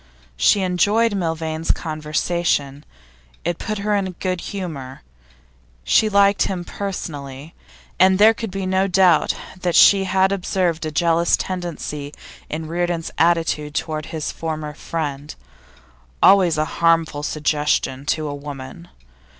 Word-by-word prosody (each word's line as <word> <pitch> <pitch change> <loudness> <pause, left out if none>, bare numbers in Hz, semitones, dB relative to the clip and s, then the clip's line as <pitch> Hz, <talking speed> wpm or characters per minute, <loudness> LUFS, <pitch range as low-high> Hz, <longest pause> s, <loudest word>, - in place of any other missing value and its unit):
She 195 - +3
enjoyed 205 +5 +2
Milvain's 160 -3 -3
conversation, 155 -2 -1 0.6
it 175 0 -2
put 215 -1 -3
her 205 +1 0
into 195 -2 -1
a - - -8
good 185 -1 -3
humour; 150 -10 -6 0.8
she 215 - +3
liked 200 0 +3
him 180 -3 -4
personally, 150 -8 -6 0.5
and 190 +1 +5
there 215 +3 +6
could 225 -1 -5
be 195 0 -4
no 190 +1 +1
doubt 180 -3 +3 0.3
that 175 -2 0
she 195 -1 +6
had 190 0 +2
observed 180 -4 -1
a - - -4
jealous 170 +2 +2
tendency 160 -5 -5 0.3
in 155 +1 -4
Reardon's 170 0 -2
attitude 165 -3 +1
to 160 0 -2
his 155 -1 -4
former 155 -2 -5
friend 145 -2 -5 0.9
always 185 -5 +5
a 155 - +1 0.2
harmful 165 -3 +2
suggestion 150 -3 -1
to 155 0 0
a 145 - -4
woman. 135 - -9
165 Hz, 130 wpm, -21 LUFS, 150-190 Hz, 0.9 s, there